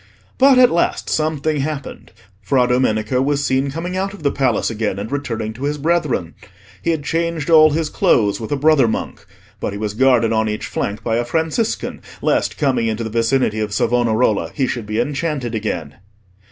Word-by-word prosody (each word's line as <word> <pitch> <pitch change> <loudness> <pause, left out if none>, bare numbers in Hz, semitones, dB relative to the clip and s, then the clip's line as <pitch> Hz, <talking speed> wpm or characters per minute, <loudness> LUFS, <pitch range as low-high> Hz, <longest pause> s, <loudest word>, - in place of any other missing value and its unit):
But 270 -1 +6
at 250 -1 +6
last 170 - 0
something 155 -1 0
happened: 140 0 -5 0.3
Fra 125 +5 +2
Domenico 125 -1 +1
was 140 +1 0
seen 135 +1 +1
coming 170 +6 -4
out 195 +2 -2
of 190 - -14
the 140 - +2
Palace 130 -4 0
again, 105 -3 -2
and 105 +3 -5
returning 115 -6 -3
to 130 +5 -5
his 150 +1 -1
brethren. 150 - 0 0.5
He - - -2
had 160 -3 0
changed 165 -1 -1
all 155 -1 +8
his 155 0 -1
clothes 105 -4 +2
with 110 - -6
a - - +2
brother 150 -3 +4
monk, 110 - -4 0.4
but - - -3
he - - -5
was 105 -1 -3
guarded 120 -1 +3
on 110 0 +1
each 105 - -3
flank 100 +1 -4
by 115 -1 0
a 120 - 0
Franciscan, 160 - -2 0.2
lest - - 0
coming 130 -6 +1
into 110 +1 -2
the 110 - -5
vicinity 115 0 +1
of 105 -1 -2
Savonarola 115 -2 +1
he 135 - +1
should 120 -4 -4
be 105 +1 -2
enchanted 140 -1 -2
again. 85 -9 -4
130 Hz, 190 wpm, -19 LUFS, 110-155 Hz, 0.5 s, all